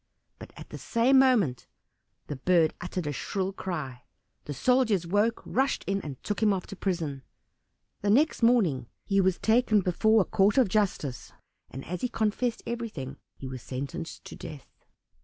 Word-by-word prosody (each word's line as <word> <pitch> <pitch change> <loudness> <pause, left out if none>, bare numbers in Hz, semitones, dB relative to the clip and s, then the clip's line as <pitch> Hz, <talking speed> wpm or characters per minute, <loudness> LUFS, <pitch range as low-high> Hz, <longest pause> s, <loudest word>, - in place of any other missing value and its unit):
But - - -10
at - - -10
the - - -7
same 255 +4 +3
moment 220 - +3 0.6
the 145 - -5
bird 165 +2 +3
uttered 175 -1 -4
a 150 - -1
shrill 195 +5 -2
cry. 150 -11 -5 0.4
The 145 - -4
soldiers 225 - +2
awoke, 205 +6 +1
rushed 265 +2 0
in, 195 0 -1
and 145 -6 -7
took 210 - -3
him 215 -1 +4
off 190 -2 -1
to - - -8
prison. 165 -8 -2 0.8
The 205 - 0
next 280 +9 +3
morning 190 - +3 0.2
he 195 -1 +2
was 190 -1 +2
taken 220 -2 +3
before 220 +5 +3
a - - 0
court 200 +4 +2
of 250 -7 +5
justice, 180 - -1 0.4
and 135 +2 -8
as 180 +2 -5
he 250 - 0
confessed 225 +1 -1
everything, 215 - -5 0.3
was 130 -2 -6
sentenced 140 +8 -6
to - - -9
death. 145 -4 -10
195 Hz, 165 wpm, -28 LUFS, 150-225 Hz, 0.8 s, of